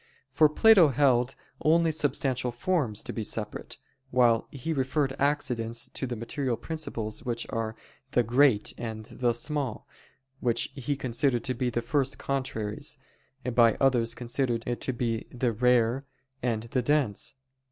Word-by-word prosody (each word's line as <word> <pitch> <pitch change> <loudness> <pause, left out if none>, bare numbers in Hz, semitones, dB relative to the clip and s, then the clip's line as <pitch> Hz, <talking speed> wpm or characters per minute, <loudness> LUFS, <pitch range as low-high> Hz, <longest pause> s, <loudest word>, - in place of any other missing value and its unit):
For 155 +3 +5
Plato 200 +1 +7
held 135 -2 +2 0.3
only 165 +1 +4
substantial 135 -4 0
forms 125 - -1
to - - -5
be 110 - -3
separate; 105 0 -4 0.3
while 120 -3 +3
he 145 +4 -4
referred 135 0 0
accidents 125 -5 0
to 130 - -4
the 120 - -3
material 120 +2 -2
principles 120 -10 -5
which 120 -1 -2
are 110 -1 -2 0.4
"the 120 - +4
great" 120 -1 +3
and 110 -2 -5
"the 120 +1 0
small," 130 0 -3 0.5
which 120 -2 +1
he 140 +1 -2
considered 130 -1 0
to 130 - 0
be 125 +1 -1
the 120 0 -2
first 135 +2 0
contraries, 110 -6 -3 0.6
by 115 -2 +5
others 120 -4 +2
considered 120 -1 -1 0.2
to - - -1
the 115 -2 -2
"the 125 -1 0
rare" 125 +2 +2 0.4
and 115 -3 -1
"the 125 +2 -1
dense." 135 -4 0
125 Hz, 140 wpm, -28 LUFS, 115-140 Hz, 0.6 s, Plato